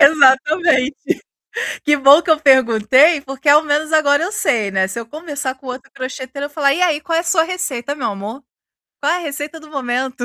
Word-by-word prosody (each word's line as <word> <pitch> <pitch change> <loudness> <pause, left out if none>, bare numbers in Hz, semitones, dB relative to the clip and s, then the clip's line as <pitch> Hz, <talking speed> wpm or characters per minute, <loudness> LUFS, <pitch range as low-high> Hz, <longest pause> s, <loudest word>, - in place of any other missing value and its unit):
Exatamente. 280 0 +4 0.9
Que 295 0 +2
bom 280 +4 +6
que 340 - -7
eu 310 -1 +4
perguntei, 260 +3 +4
porque 275 +1 -9
ao 300 +2 +6
menos 305 +1 -1
agora 310 -1 +3
eu 375 - -3
sei, 240 - 0
né. 190 0 0
Se 190 +5 -6
eu 230 - -7
conversar 290 -3 -6
com 265 0 -16
outro 250 +1 -8
crocheteiro, 260 +2 -6
eu - - -7
falar: 285 -2 +1
"E 355 - -3
aí, 310 -4 +1
qual 330 +3 -3
é - - +1
a - - -13
sua 330 -2 +2
receita, 285 -7 -4
meu 265 - -3
amor? 210 +7 -8 0.6
Qual - - +1
é - - 0
a - - -3
receita 300 0 -6
do 310 -1 -16
momento?" 255 -2 -3
285 Hz, 210 wpm, -17 LUFS, 260-310 Hz, 0.9 s, bom